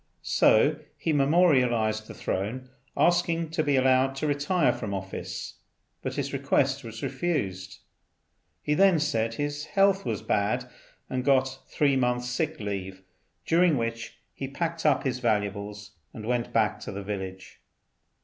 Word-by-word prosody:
So -, -, +4 dB, 0.2 s
he 160 Hz, -, -1 dB
memorialized 125 Hz, -8 st, +3 dB
the -, -, -9 dB
Throne, 120 Hz, +7 st, -3 dB, 0.3 s
asking 170 Hz, -2 st, +2 dB
to 160 Hz, -, 0 dB
be 145 Hz, -2 st, +1 dB
allowed 130 Hz, 0 st, +3 dB
to 135 Hz, -, -3 dB
retire 145 Hz, +3 st, +2 dB
from 100 Hz, -3 st, -4 dB
office, 95 Hz, 0 st, -6 dB, 0.4 s
but -, -, -4 dB
his -, -, -3 dB
request -, -, +1 dB
was -, -, -8 dB
refused. 95 Hz, -, -2 dB, 0.9 s
He 150 Hz, -, +1 dB
then 190 Hz, +2 st, +5 dB
said 115 Hz, -6 st, 0 dB
his 145 Hz, +1 st, -3 dB
health 195 Hz, -1 st, +3 dB
was 110 Hz, -3 st, -3 dB
bad, 120 Hz, +5 st, 0 dB, 0.4 s
and 130 Hz, -1 st, -2 dB
got 135 Hz, -1 st, +2 dB
three 140 Hz, -2 st, +2 dB
months' 125 Hz, -1 st, 0 dB
sick 155 Hz, +5 st, -2 dB
leave, 95 Hz, -2 st, -5 dB, 0.4 s
during 170 Hz, -2 st, +4 dB
which 115 Hz, -1 st, -4 dB, 0.2 s
he 135 Hz, -, -5 dB
packed 165 Hz, +3 st, -2 dB
up 140 Hz, -3 st, +3 dB
his 130 Hz, -2 st, -1 dB
valuables 105 Hz, -2 st, -2 dB, 0.2 s
and 110 Hz, -, -7 dB
went 120 Hz, 0 st, -1 dB
back 110 Hz, -2 st, +1 dB
to -, -, -7 dB
the 100 Hz, 0 st, -6 dB
village. 95 Hz, -2 st, -6 dB
130 Hz, 145 wpm, -27 LUFS, 105-150 Hz, 0.9 s, then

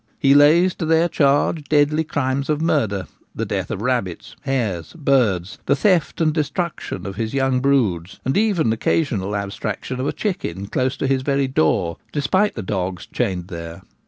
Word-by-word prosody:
He 135 Hz, 0 st, +4 dB
lays 160 Hz, +6 st, +6 dB
to 165 Hz, -, -2 dB
their 165 Hz, +1 st, +4 dB
charge 145 Hz, 0 st, +2 dB
deadly 150 Hz, +1 st, +2 dB
crimes 140 Hz, -2 st, -2 dB
of 150 Hz, -1 st, +1 dB
murder, 110 Hz, -, 0 dB, 0.3 s
the -, -, -2 dB
death -, -, -3 dB
of 100 Hz, -, -4 dB
rabbits, 120 Hz, -9 st, -2 dB
hares, 115 Hz, -, -2 dB
birds, 120 Hz, -, +1 dB
the -, -, +4 dB
theft 180 Hz, -8 st, +1 dB
and 155 Hz, -2 st, +2 dB
destruction 160 Hz, -, -3 dB
of 100 Hz, 0 st, -6 dB
his 115 Hz, +3 st, -3 dB
young 135 Hz, -1 st, +2 dB
broods, 110 Hz, -10 st, 0 dB
even 195 Hz, -, +2 dB
occasional 110 Hz, -, 0 dB
abstraction 100 Hz, +5 st, -4 dB
of 130 Hz, -, -1 dB
a -, -, +1 dB
chicken 100 Hz, -, -3 dB
close 130 Hz, +5 st, -1 dB
to -, -, -2 dB
his 135 Hz, -1 st, +1 dB
very 140 Hz, 0 st, +1 dB
door, 85 Hz, -7 st, +1 dB
despite 185 Hz, +9 st, +1 dB
the 110 Hz, -, -4 dB
dogs 95 Hz, -2 st, -3 dB
chained 95 Hz, -7 st, -2 dB
there. 85 Hz, 0 st, -7 dB
130 Hz, 165 wpm, -21 LUFS, 100-150 Hz, 0.3 s, lays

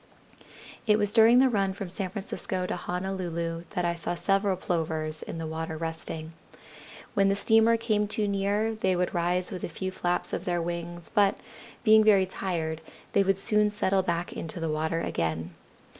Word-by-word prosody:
"It 210 Hz, -1 st, +5 dB
was 205 Hz, -1 st, 0 dB
during 230 Hz, +1 st, +7 dB
the 265 Hz, +1 st, +6 dB
run 195 Hz, -5 st, +1 dB
from 195 Hz, 0 st, -6 dB
San 185 Hz, +1 st, -2 dB
Francisco 190 Hz, -1 st, -4 dB
to -, -, -2 dB
Honolulu 175 Hz, -2 st, -3 dB
that 180 Hz, -, 0 dB
I 170 Hz, -, +1 dB
saw 170 Hz, +1 st, -3 dB
several 195 Hz, +1 st, +1 dB
Plovers 160 Hz, -3 st, -2 dB
in -, -, -6 dB
the 165 Hz, -, -4 dB
water 160 Hz, 0 st, -4 dB
resting. 160 Hz, 0 st, -5 dB, 0.8 s
When 195 Hz, -1 st, +3 dB
the 195 Hz, -, +2 dB
steamer 225 Hz, +2 st, +4 dB
came 215 Hz, -2 st, 0 dB
too 210 Hz, 0 st, +1 dB
near 200 Hz, +2 st, 0 dB
they 190 Hz, -4 st, 0 dB
would 180 Hz, 0 st, -1 dB
rise 175 Hz, +1 st, 0 dB
with 185 Hz, -, -6 dB
a -, -, -2 dB
few 185 Hz, +3 st, -4 dB
flaps 180 Hz, -1 st, -1 dB
of -, -, -3 dB
their 175 Hz, -1 st, 0 dB
wings, 170 Hz, 0 st, -4 dB
but, 200 Hz, -1 st, +4 dB, 0.5 s
being 220 Hz, -1 st, +7 dB
very 200 Hz, -3 st, +5 dB
tired, 165 Hz, -4 st, -3 dB, 0.3 s
they -, -, +5 dB
would 195 Hz, -1 st, +2 dB
soon 210 Hz, +1 st, +3 dB
settle 195 Hz, -2 st, +1 dB
back 175 Hz, -1 st, -2 dB
into 165 Hz, +2 st, -6 dB
the 165 Hz, -1 st, -1 dB
water 160 Hz, +2 st, -1 dB
again. 80 Hz, -, -2 dB
185 Hz, 180 wpm, -28 LUFS, 165-200 Hz, 0.8 s, during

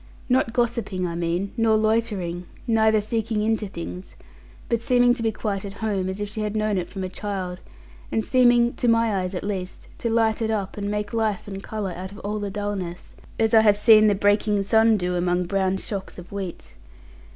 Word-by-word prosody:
Not 250 Hz, -2 st, +2 dB
gossiping, 230 Hz, -6 st, -1 dB
I 170 Hz, -, -3 dB
mean, 170 Hz, +3 st, -2 dB
nor 225 Hz, -2 st, +3 dB
loitering, 210 Hz, -6 st, -1 dB, 0.2 s
neither 220 Hz, -2 st, +3 dB
seeking 220 Hz, 0 st, -1 dB
into 220 Hz, -1 st, 0 dB
things, 180 Hz, 0 st, -8 dB, 0.5 s
but 235 Hz, -1 st, 0 dB
seeming 245 Hz, 0 st, +4 dB
to 245 Hz, -, -5 dB
be 225 Hz, -1 st, +1 dB
quite 205 Hz, -2 st, -3 dB
at 200 Hz, -1 st, -6 dB
home, 200 Hz, -3 st, -2 dB
as 190 Hz, +2 st, -4 dB
if 205 Hz, -, -2 dB
she 215 Hz, +1 st, -5 dB
had 210 Hz, 0 st, -2 dB
known 215 Hz, -2 st, +1 dB
it 175 Hz, -, -5 dB
from 195 Hz, -2 st, -5 dB
a -, -, -2 dB
child, 185 Hz, -2 st, -5 dB, 0.5 s
and 220 Hz, -, 0 dB
seeming 240 Hz, -2 st, +4 dB
(to 245 Hz, -, 0 dB
my 230 Hz, -2 st, +3 dB
eyes 185 Hz, +1 st, -3 dB
at -, -, -4 dB
least) 190 Hz, -3 st, -5 dB
to 235 Hz, -, -1 dB
light 225 Hz, -1 st, +2 dB
it 220 Hz, -, 0 dB
up, 205 Hz, -4 st, -2 dB
and 205 Hz, -1 st, -3 dB
make 210 Hz, 0 st, -3 dB
life 220 Hz, -4 st, -1 dB
and 195 Hz, -1 st, -6 dB
colour 205 Hz, -2 st, -4 dB
out 185 Hz, +2 st, -7 dB
of 200 Hz, -, -11 dB
all 210 Hz, +1 st, -3 dB
the 205 Hz, -1 st, -3 dB
dullness; 195 Hz, -4 st, -5 dB, 0.2 s
as 225 Hz, 0 st, +1 dB
I 220 Hz, -, +8 dB
have 210 Hz, -2 st, +5 dB
seen 215 Hz, 0 st, +7 dB
the 205 Hz, -, +3 dB
breaking 205 Hz, 0 st, +2 dB
sun 220 Hz, +2 st, +4 dB
do 180 Hz, -1 st, -1 dB
among 175 Hz, 0 st, +1 dB
brown 190 Hz, +1 st, 0 dB
shocks 195 Hz, -1 st, -6 dB
of 180 Hz, -1 st, -11 dB
wheat. 185 Hz, -, -6 dB
205 Hz, 205 wpm, -24 LUFS, 190-225 Hz, 0.5 s, I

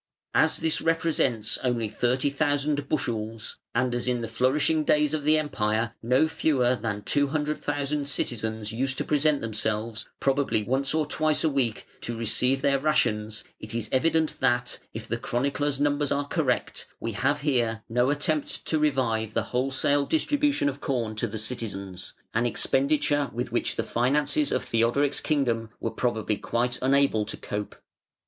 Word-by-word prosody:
As -, -, +3 dB
this 160 Hz, -1 st, +1 dB
represents 160 Hz, -9 st, +1 dB
only 120 Hz, -3 st, 0 dB
30,000 140 Hz, +5 st, 0 dB
bushels, 115 Hz, -6 st, -3 dB, 0.2 s
and 125 Hz, -1 st, +1 dB
as 120 Hz, 0 st, -2 dB
in 125 Hz, -1 st, 0 dB
the 115 Hz, -, -3 dB
flourishing 140 Hz, +7 st, +2 dB
days 150 Hz, 0 st, +2 dB
of 155 Hz, -2 st, -1 dB
the 155 Hz, +1 st, +5 dB
Empire 115 Hz, -6 st, 0 dB
no 125 Hz, +6 st, +3 dB
fewer 130 Hz, -6 st, +2 dB
than 105 Hz, -4 st, -4 dB
200,000 145 Hz, 0 st, -1 dB
citizens 110 Hz, -5 st, -2 dB
used 130 Hz, +4 st, -1 dB
to -, -, 0 dB
present 150 Hz, 0 st, +2 dB
themselves, 110 Hz, 0 st, -3 dB
probably 135 Hz, -5 st, +1 dB
once 135 Hz, +6 st, +1 dB
or 155 Hz, -1 st, +2 dB
twice 155 Hz, +1 st, +1 dB
a 160 Hz, -, +2 dB
week, 125 Hz, -6 st, -1 dB, 0.2 s
to 120 Hz, -1 st, -3 dB
receive 125 Hz, +4 st, +1 dB
their 140 Hz, -1 st, +3 dB
rations, 110 Hz, -8 st, 0 dB, 0.2 s
it 110 Hz, +1 st, -7 dB
is 115 Hz, -2 st, -2 dB
evident 160 Hz, +3 st, +1 dB
that 125 Hz, 0 st, +1 dB
(if -, -, -7 dB
the -, -, -2 dB
chronicler's 140 Hz, +3 st, -1 dB
numbers 145 Hz, 0 st, +1 dB
are 140 Hz, 0 st, +1 dB
correct) 145 Hz, -6 st, -1 dB
we 115 Hz, -, -3 dB
have 140 Hz, +7 st, 0 dB
here 120 Hz, -6 st, 0 dB
no 125 Hz, +3 st, +2 dB
attempt 145 Hz, +1 st, -1 dB
to 160 Hz, -, 0 dB
revive 115 Hz, -7 st, 0 dB
the 115 Hz, -, +2 dB
wholesale 135 Hz, +2 st, +1 dB
distribution 295 Hz, -, +1 dB
of 140 Hz, 0 st, -3 dB
corn 115 Hz, -5 st, -1 dB
to 115 Hz, +2 st, 0 dB
the 110 Hz, +1 st, -5 dB
citizens 100 Hz, -5 st, -4 dB, 0.2 s
an 120 Hz, +2 st, +2 dB
expenditure 145 Hz, +3 st, +1 dB
with 120 Hz, +2 st, -4 dB
which -, -, -1 dB
the -, -, -1 dB
finances 145 Hz, -, +1 dB
of -, -, 0 dB
Theodoric's 120 Hz, +5 st, +2 dB
kingdom 120 Hz, -7 st, 0 dB
were 115 Hz, -, -2 dB
probably 110 Hz, -4 st, -1 dB
quite 120 Hz, +3 st, -1 dB
unable 135 Hz, -4 st, +3 dB
to -, -, -6 dB
cope. 105 Hz, 0 st, -5 dB
130 Hz, 155 wpm, -26 LUFS, 115-145 Hz, 0.2 s, the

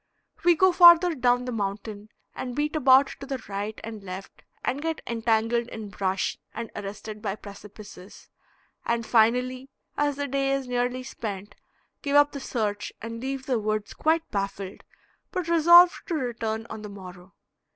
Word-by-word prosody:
We 345 Hz, -1 st, +5 dB
go 375 Hz, +3 st, +5 dB
farther 345 Hz, 0 st, +8 dB
down 245 Hz, -3 st, +1 dB
the 250 Hz, -, -3 dB
mountain 210 Hz, 0 st, -4 dB, 0.2 s
and 250 Hz, -1 st, -5 dB
beat 300 Hz, +2 st, -1 dB
about 270 Hz, -2 st, +6 dB
to 275 Hz, -, -8 dB
the 270 Hz, -1 st, -2 dB
right 205 Hz, +2 st, -4 dB
and 220 Hz, -2 st, -7 dB
left 185 Hz, 0 st, -9 dB, 0.2 s
and 275 Hz, -, -1 dB
get 325 Hz, 0 st, -2 dB
entangled 230 Hz, 0 st, 0 dB
in 220 Hz, -3 st, -8 dB
brush 190 Hz, -1 st, -2 dB, 0.2 s
and 230 Hz, -1 st, -5 dB
arrested 210 Hz, +1 st, -7 dB
by 200 Hz, -3 st, -2 dB
precipices, 200 Hz, -2 st, -12 dB, 0.6 s
and 235 Hz, -1 st, -1 dB
finally 250 Hz, +4 st, +2 dB, 0.3 s
as 290 Hz, -1 st, +1 dB
the 285 Hz, 0 st, -3 dB
day 275 Hz, 0 st, 0 dB
is 275 Hz, -2 st, -2 dB
nearly 250 Hz, +1 st, -1 dB
spent, 205 Hz, -6 st, -6 dB, 0.5 s
give 285 Hz, -1 st, -1 dB
up 290 Hz, 0 st, +6 dB
the 280 Hz, -, -6 dB
search 210 Hz, -6 st, -3 dB
and 230 Hz, +1 st, -6 dB
leave 265 Hz, 0 st, -4 dB
the 255 Hz, -3 st, 0 dB
woods 215 Hz, 0 st, -2 dB
quite 320 Hz, +1 st, +1 dB
baffled, 195 Hz, -1 st, -4 dB, 0.5 s
but 365 Hz, -4 st, -3 dB
resolved 345 Hz, +2 st, +6 dB
to 345 Hz, -, -1 dB
return 225 Hz, -5 st, -3 dB
on 220 Hz, -1 st, -6 dB
the 210 Hz, -, -8 dB
morrow. 185 Hz, -2 st, -12 dB
235 Hz, 160 wpm, -26 LUFS, 210-275 Hz, 0.6 s, farther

